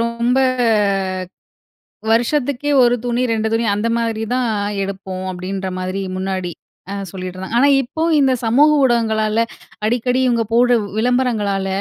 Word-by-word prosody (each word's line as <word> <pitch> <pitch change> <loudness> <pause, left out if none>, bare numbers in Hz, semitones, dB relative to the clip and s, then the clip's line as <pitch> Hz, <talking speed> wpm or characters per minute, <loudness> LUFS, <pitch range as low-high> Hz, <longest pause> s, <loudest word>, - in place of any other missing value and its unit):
ரொம்ப 235 +2 0 1.7
வருஷத்துக்கே 280 +4 +1
ஒரு 240 0 +4
துணி, 245 +1 0
2 220 0 0
துணி, 230 0 +1
அந்த 210 +3 -1
மாதிரி 225 -1 -2
தான் 250 -2 0 0.3
எடுப்போம். 190 -1 -5
அப்படின்ற 190 +1 -4
மாதிரி 185 +1 -3
முன்னாடி 185 -2 -3 0.4
அ - - -3 0.2
சொல்லிட்ற 185 0 -6
ஆனா 280 +3 +5
இப்போ 295 +6 -4 0.2
இந்த 270 -2 +3
சமூக 280 +7 +4
ஊடகங்களால 225 -2 +1 0.4
அடிக்கடி 245 +3 +1
இவங்க 235 -2 +2
போடு 245 +1 +4
உ - - -7
விளம்பரங்களால 220 -5 0
230 Hz, 125 wpm, -18 LUFS, 195-245 Hz, 1.7 s, ஆனா